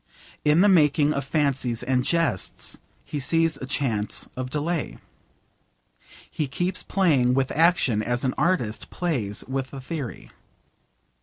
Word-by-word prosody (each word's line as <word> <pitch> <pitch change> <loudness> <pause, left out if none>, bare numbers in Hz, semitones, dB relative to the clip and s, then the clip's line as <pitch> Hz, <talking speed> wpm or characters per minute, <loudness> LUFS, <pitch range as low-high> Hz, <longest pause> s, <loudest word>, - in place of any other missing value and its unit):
In 150 +3 +4
the 205 - +6
making 150 -5 +4
of 140 - -2
fancies 135 -5 0
and 125 0 +1
jests 165 - -1 0.3
he 145 - -4
sees 165 +3 +2
a 130 - -7
chance 115 -7 -1
of 130 0 -4
delay. 155 +3 -2 1.3
He 150 - -3
keeps 175 +7 -2
playing 140 -10 +2
with 135 -1 +1
action 155 -9 +3
as 120 +2 -1
an 130 - +1
artist 150 -9 0
plays 125 - -2
with 130 0 -3
a - - -6
theory. 130 -2 -6
140 Hz, 135 wpm, -25 LUFS, 125-165 Hz, 1.3 s, the